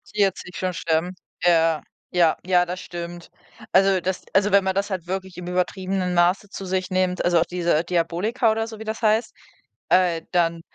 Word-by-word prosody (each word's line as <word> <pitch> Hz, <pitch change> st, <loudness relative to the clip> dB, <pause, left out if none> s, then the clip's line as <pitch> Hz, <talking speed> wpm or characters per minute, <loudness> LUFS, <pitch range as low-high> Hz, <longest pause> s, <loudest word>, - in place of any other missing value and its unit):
40 195 Hz, -3 st, 0 dB
schon 185 Hz, -1 st, -2 dB
sterben. 165 Hz, +2 st, -1 dB, 0.3 s
Ja, 165 Hz, -2 st, +3 dB, 0.3 s
ja, 170 Hz, -3 st, +3 dB
ja, 180 Hz, -1 st, +3 dB
das 180 Hz, +1 st, -5 dB
stimmt. 175 Hz, 0 st, -8 dB, 0.4 s
Also 190 Hz, -1 st, +4 dB
das 185 Hz, +1 st, -3 dB
also 200 Hz, +1 st, +3 dB
wenn 200 Hz, 0 st, +5 dB
man 190 Hz, 0 st, -1 dB
das 200 Hz, +2 st, 0 dB
halt 185 Hz, -4 st, -4 dB
wirklich 190 Hz, -1 st, -5 dB
im 180 Hz, -, -7 dB
übertriebenen 185 Hz, 0 st, -1 dB
Maße 180 Hz, +3 st, +2 dB
zu 195 Hz, -, -7 dB
sich 185 Hz, 0 st, -2 dB
nehmt, 185 Hz, -1 st, 0 dB
also 175 Hz, -1 st, +3 dB
auch 165 Hz, -, +2 dB
diese 170 Hz, -3 st, 0 dB
Diabolika 180 Hz, +7 st, 0 dB
oder 225 Hz, +1 st, -1 dB
so, 220 Hz, -1 st, -9 dB
wie -, -, -6 dB
das 220 Hz, +1 st, -5 dB
heißt, 220 Hz, +1 st, +2 dB, 0.6 s
äh, 175 Hz, -3 st, +3 dB
dann 170 Hz, -2 st, +1 dB
180 Hz, 185 wpm, -23 LUFS, 175-195 Hz, 0.6 s, wenn